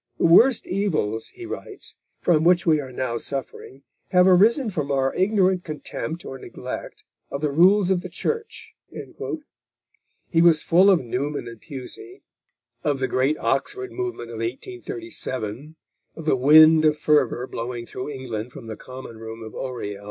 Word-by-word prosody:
"The -, -, +1 dB
worst 230 Hz, +9 st, +6 dB
evils," 155 Hz, -, -1 dB
he 360 Hz, -, -10 dB
writes, 395 Hz, +3 st, -7 dB, 0.3 s
"from 160 Hz, -3 st, +3 dB
which 175 Hz, +1 st, +4 dB
we 155 Hz, -3 st, +3 dB
are 130 Hz, -2 st, -9 dB
now 125 Hz, -2 st, -2 dB
suffering, 135 Hz, +1 st, -5 dB, 0.3 s
have 180 Hz, 0 st, +5 dB
arisen 215 Hz, +7 st, +4 dB
from 145 Hz, -5 st, -2 dB
our 135 Hz, -1 st, +1 dB
ignorant 190 Hz, -2 st, +2 dB
contempt 155 Hz, +2 st, -5 dB
or 135 Hz, -, -7 dB
neglect -, -, -8 dB, 0.3 s
of 140 Hz, -, -5 dB
the 150 Hz, -2 st, 0 dB
rules 185 Hz, +5 st, +5 dB
of 180 Hz, -2 st, +2 dB
the 185 Hz, -, -7 dB
Church." 455 Hz, -, -4 dB, 1.6 s
He 165 Hz, -, +4 dB
was 165 Hz, -3 st, +5 dB
full 185 Hz, +4 st, +5 dB
of 190 Hz, -4 st, +5 dB
Newman 135 Hz, +3 st, -3 dB
and 115 Hz, -2 st, -10 dB
Pusey, 370 Hz, -, -8 dB, 0.6 s
of 145 Hz, -2 st, +1 dB
the 130 Hz, 0 st, -1 dB
great 135 Hz, +5 st, +1 dB
Oxford 380 Hz, -, -1 dB
movement 365 Hz, -, -5 dB
of 115 Hz, -, -7 dB
1837, 150 Hz, -, -5 dB, 0.4 s
of 165 Hz, -, -9 dB
the 155 Hz, -, +3 dB
wind 155 Hz, +4 st, +7 dB
of 150 Hz, -1 st, +3 dB
fervour 135 Hz, -6 st, +2 dB
blowing 120 Hz, -1 st, -5 dB
through 130 Hz, +4 st, -6 dB
England 125 Hz, -4 st, -5 dB
from 135 Hz, -5 st, -11 dB
the 110 Hz, -1 st, -6 dB
common 130 Hz, -2 st, -10 dB
room 115 Hz, 0 st, -8 dB
of 110 Hz, -, -9 dB
Oriel. 120 Hz, -6 st, -5 dB
150 Hz, 160 wpm, -23 LUFS, 130-185 Hz, 1.6 s, wind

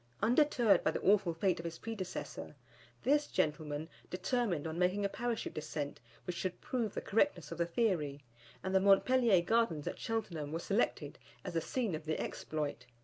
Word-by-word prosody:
Undeterred 240 Hz, -2 st, +4 dB
by -, -, +3 dB
the -, -, -2 dB
awful 195 Hz, -3 st, +4 dB
fate 180 Hz, +3 st, +1 dB
of -, -, -5 dB
his 170 Hz, -1 st, -5 dB
predecessor, 185 Hz, -, -5 dB, 0.5 s
this 290 Hz, +2 st, +3 dB
gentleman 150 Hz, 0 st, -1 dB, 0.2 s
determined 185 Hz, -, 0 dB
on 160 Hz, +1 st, -3 dB
making 185 Hz, +3 st, +2 dB
a -, -, +1 dB
Parachute 240 Hz, +2 st, -2 dB
descent 150 Hz, -1 st, -4 dB, 0.3 s
which 180 Hz, -, -3 dB
should 185 Hz, +1 st, -3 dB
prove 235 Hz, -5 st, -2 dB
the -, -, -2 dB
correctness 190 Hz, -, +1 dB
of 165 Hz, -, -6 dB
the 170 Hz, -, +2 dB
theory, 165 Hz, -9 st, 0 dB, 0.4 s
and 190 Hz, -, -2 dB
the 190 Hz, -, +6 dB
Montpellier 200 Hz, 0 st, +5 dB
Gardens 220 Hz, -8 st, +2 dB
at -, -, -4 dB
Cheltenham 170 Hz, -10 st, -3 dB
were 160 Hz, -, -1 dB
selected 170 Hz, -5 st, -1 dB, 0.3 s
as -, -, -4 dB
the 165 Hz, -, +1 dB
scene 230 Hz, +2 st, -1 dB
of 155 Hz, 0 st, -4 dB
the 155 Hz, 0 st, -1 dB
exploit. 145 Hz, -5 st, -3 dB
180 Hz, 175 wpm, -34 LUFS, 155-225 Hz, 0.5 s, the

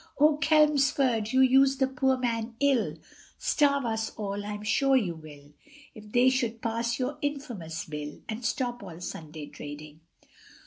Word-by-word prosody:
Oh! 300 Hz, +1 st, +5 dB
Chelmsford, 280 Hz, -7 st, +3 dB
you 260 Hz, 0 st, +4 dB
use 270 Hz, +1 st, +5 dB
the 265 Hz, -, +3 dB
poor 265 Hz, 0 st, +1 dB
man 230 Hz, -2 st, -2 dB
ill, 275 Hz, -4 st, +2 dB, 0.4 s
Starve 280 Hz, -3 st, +2 dB
us 220 Hz, -1 st, -1 dB
all, 205 Hz, -1 st, -3 dB
I'm 205 Hz, 0 st, -5 dB
sure 270 Hz, +6 st, +3 dB
you 190 Hz, -9 st, 0 dB
will, 150 Hz, -2 st, -13 dB, 0.4 s
If 215 Hz, -3 st, -13 dB
they 245 Hz, +3 st, +4 dB
should 235 Hz, -3 st, -1 dB
pass 230 Hz, +1 st, -1 dB
your 270 Hz, +3 st, -3 dB
infamous 245 Hz, -, -4 dB
Bill, 150 Hz, -1 st, -6 dB
And 220 Hz, +2 st, -5 dB
stop 245 Hz, 0 st, -2 dB
all 175 Hz, -4 st, -9 dB
Sunday 155 Hz, -3 st, -7 dB
trading. 150 Hz, +1 st, -10 dB
235 Hz, 150 wpm, -28 LUFS, 200-270 Hz, 0.4 s, Oh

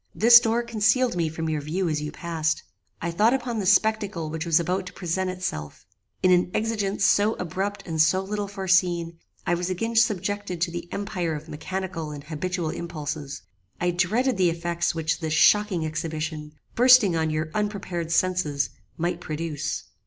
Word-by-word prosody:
This 235 Hz, +2 st, +9 dB
door 235 Hz, 0 st, 0 dB
concealed 235 Hz, +1 st, +2 dB
me 165 Hz, -2 st, 0 dB
from 160 Hz, +1 st, -4 dB
your 155 Hz, -2 st, -1 dB
view 170 Hz, +6 st, -2 dB
as 155 Hz, -2 st, -1 dB
you 150 Hz, -, -4 dB
passed. 160 Hz, -2 st, -2 dB, 0.4 s
I 170 Hz, -, -1 dB
thought 215 Hz, +9 st, +3 dB
upon 245 Hz, -4 st, -3 dB
the 195 Hz, -, -2 dB
spectacle 200 Hz, -5 st, +2 dB
which 160 Hz, +1 st, -4 dB
was 165 Hz, 0 st, +4 dB
about 180 Hz, +3 st, -1 dB
to -, -, -9 dB
present 185 Hz, +1 st, -2 dB
itself. 80 Hz, -, -5 dB, 0.4 s
In 185 Hz, -, +5 dB
an 180 Hz, 0 st, +4 dB
exigence 210 Hz, -3 st, 0 dB
so 210 Hz, +2 st, +3 dB
abrupt 195 Hz, +3 st, -3 dB
and 160 Hz, -3 st, 0 dB
so 160 Hz, +4 st, +4 dB
little 205 Hz, +1 st, -3 dB
foreseen, 180 Hz, -4 st, +1 dB, 0.3 s
I 175 Hz, -, +1 dB
was 175 Hz, +1 st, -1 dB
again 225 Hz, +6 st, -2 dB
subjected 205 Hz, -4 st, +1 dB
to 170 Hz, -, +1 dB
the 175 Hz, 0 st, -7 dB
empire 180 Hz, -5 st, -2 dB
of 150 Hz, +2 st, -8 dB
mechanical 165 Hz, +1 st, -5 dB
and 145 Hz, -1 st, -8 dB
habitual 165 Hz, +2 st, -3 dB
impulses. 150 Hz, -, -5 dB, 0.4 s
I 175 Hz, 0 st, +1 dB
dreaded 220 Hz, +9 st, +1 dB
the 185 Hz, -2 st, +4 dB
effects 170 Hz, 0 st, -1 dB
which 160 Hz, 0 st, -1 dB
this 160 Hz, -2 st, -2 dB
shocking 200 Hz, -1 st, +4 dB
exhibition, 155 Hz, -1 st, -4 dB, 0.2 s
bursting 245 Hz, -7 st, +6 dB
on 160 Hz, -1 st, +1 dB
your 155 Hz, +1 st, -2 dB
unprepared 190 Hz, -5 st, -3 dB
senses, 165 Hz, -5 st, +1 dB, 0.3 s
might 175 Hz, +1 st, -2 dB
produce. 155 Hz, -3 st, -3 dB
175 Hz, 170 wpm, -25 LUFS, 160-200 Hz, 0.4 s, This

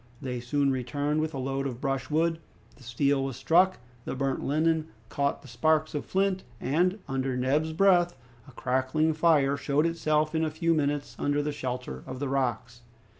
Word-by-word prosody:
They 125 Hz, -3 st, -4 dB
soon 140 Hz, +3 st, +1 dB
returned 145 Hz, +4 st, -1 dB
with 155 Hz, 0 st, -1 dB
a -, -, -3 dB
load 135 Hz, +1 st, -2 dB
of 125 Hz, -3 st, -6 dB
brushwood. 155 Hz, +4 st, 0 dB, 0.4 s
The -, -, -20 dB
steel 135 Hz, +3 st, +1 dB
was 135 Hz, -2 st, -3 dB
struck, 180 Hz, +7 st, +3 dB, 0.3 s
the -, -, -4 dB
burnt 135 Hz, 0 st, -1 dB
linen 160 Hz, +2 st, +1 dB, 0.2 s
caught 140 Hz, 0 st, -1 dB
the -, -, -12 dB
sparks 155 Hz, +6 st, +1 dB
of 145 Hz, -, -3 dB
flint, 190 Hz, 0 st, 0 dB, 0.2 s
and, 175 Hz, +9 st, +1 dB
under 135 Hz, -1 st, -1 dB
Neb's 145 Hz, +5 st, +1 dB
breath, 175 Hz, -2 st, +3 dB, 0.3 s
a -, -, -12 dB
crackling 130 Hz, +5 st, 0 dB
fire 150 Hz, -4 st, +3 dB
showed 145 Hz, +2 st, +1 dB
itself 155 Hz, -2 st, +1 dB
in 160 Hz, 0 st, +1 dB
a 160 Hz, -, +1 dB
few 165 Hz, +2 st, +1 dB
minutes 145 Hz, -2 st, -1 dB
under 145 Hz, 0 st, +1 dB
the 150 Hz, -, -1 dB
shelter 125 Hz, -3 st, -5 dB
of 130 Hz, -1 st, -6 dB
the 140 Hz, 0 st, -3 dB
rocks. 120 Hz, -3 st, -2 dB
145 Hz, 175 wpm, -28 LUFS, 130-160 Hz, 0.4 s, struck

